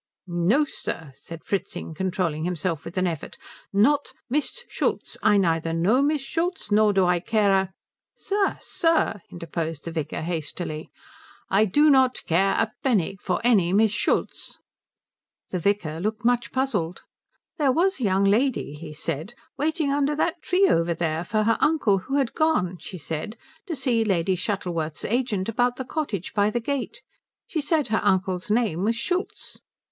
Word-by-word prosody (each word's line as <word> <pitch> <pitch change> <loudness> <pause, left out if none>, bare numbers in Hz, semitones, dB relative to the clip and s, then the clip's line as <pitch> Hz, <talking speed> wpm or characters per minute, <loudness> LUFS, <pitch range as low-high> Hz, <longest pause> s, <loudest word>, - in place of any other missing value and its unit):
"No 185 - +2
sir," 160 - -5
said 165 +4 -11
Fritzing, 195 -4 -3
controlling 175 -3 -1
himself 170 -2 -2
with 170 - -8
an 185 - +2
effort, 165 -5 -4 0.3
"not 280 +9 +2 0.2
Miss 300 - -1
Schultz. - - -2
I 205 -1 +4
neither 165 -3 +1
know 195 +11 +3
Miss 290 0 +1
Schultz 335 - -2
nor 210 0 +5
do 190 -2 +3
I 180 -1 +3
care 210 +2 +2
a 190 -1 +1 0.2
" - - -67
"Sir, 400 -1 +1
sir," 330 - +1
interposed 165 -2 -4
the 170 - -4
vicar, 160 -2 -3
hastily. 160 -1 -4 0.6
"I 205 +3 +5
do 295 +10 +4
not 260 -2 +3
care 190 +4 +2
a 225 - +1
pfenning 195 - +1
for 185 -3 -1
any 200 -7 +4
Miss 215 +1 +4
Schultz." 210 - -1 0.9
The 185 - -1
vicar 170 -4 0
looked 215 +4 -3
much 240 -2 +2
puzzled. 210 -11 -1 0.6
"There 280 -3 +4
was 365 +6 +2
a - - -3
young 195 0 +2
lady," 220 - +2
he 150 +1 -9
said, 165 +6 -4 0.2
"waiting 305 0 0
under 285 +1 +1
that 335 +2 -1
tree 375 +4 +3
over 170 - +2
there 160 -1 -1
for 215 +3 0
her 225 +1 +2
uncle 240 -11 +3
who 270 +9 -4
had 270 -4 +1
gone, 185 - +1
she 185 - -8
said, 160 +8 -5 0.3
to 335 - -2
see 250 -4 +1
Lady 190 -3 +1
Shuttleworth's 175 -5 -3
agent 225 -5 0
about 245 +2 +1
the 260 - -5
cottage 245 - -3
by 205 -1 +3
the 240 - -1
gate. 280 - -4 0.4
She 320 -6 -2
said 300 -2 +1
her 220 - +1
uncle's 190 -1 +1
name 210 -6 +1
was 225 +3 +2
Schultz." 360 - -3
205 Hz, 165 wpm, -25 LUFS, 175-265 Hz, 0.9 s, nor